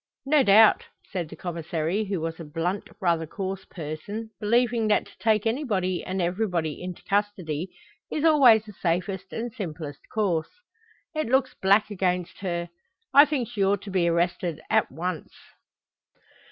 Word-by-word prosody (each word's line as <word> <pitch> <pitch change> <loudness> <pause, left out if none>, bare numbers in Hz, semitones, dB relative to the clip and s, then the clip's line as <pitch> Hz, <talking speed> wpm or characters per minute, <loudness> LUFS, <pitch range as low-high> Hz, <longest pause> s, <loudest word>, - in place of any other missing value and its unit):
"No 295 +1 +4
doubt," 215 -1 +6 0.3
said 175 -5 -3
the 160 - -9
Commissary, 170 +3 -2
who 195 -3 -2
was 165 +1 -4
a - - -6
blunt, 165 +6 -3
rather 170 -3 +1
coarse 190 +3 -5
person, 195 +8 -6
believing 230 +1 +2
that 210 - +2
to - - -17
take 220 -1 +2
anybody 210 - 0
and 190 +1 -3
everybody 175 -4 -1
into 180 -1 -7
custody 190 -5 -1 0.4
is 300 - -2
always 255 -9 +6
the 210 - -11
safest 185 +2 -2
and 230 0 -4
simplest 160 - -6
course. 185 -7 0 0.6
"It 310 -4 -1
looks 265 +2 +2
black 200 +3 +3
against 180 -3 -1
her. 175 -3 -3 0.4
I 285 +1 +9
think 275 -6 -1
she 200 -1 -1
ought 200 0 +1
to 200 - -7
be 180 -2 +2
arrested 170 -1 0
at - - +3
once." 175 0 -4
190 Hz, 155 wpm, -26 LUFS, 170-220 Hz, 0.6 s, I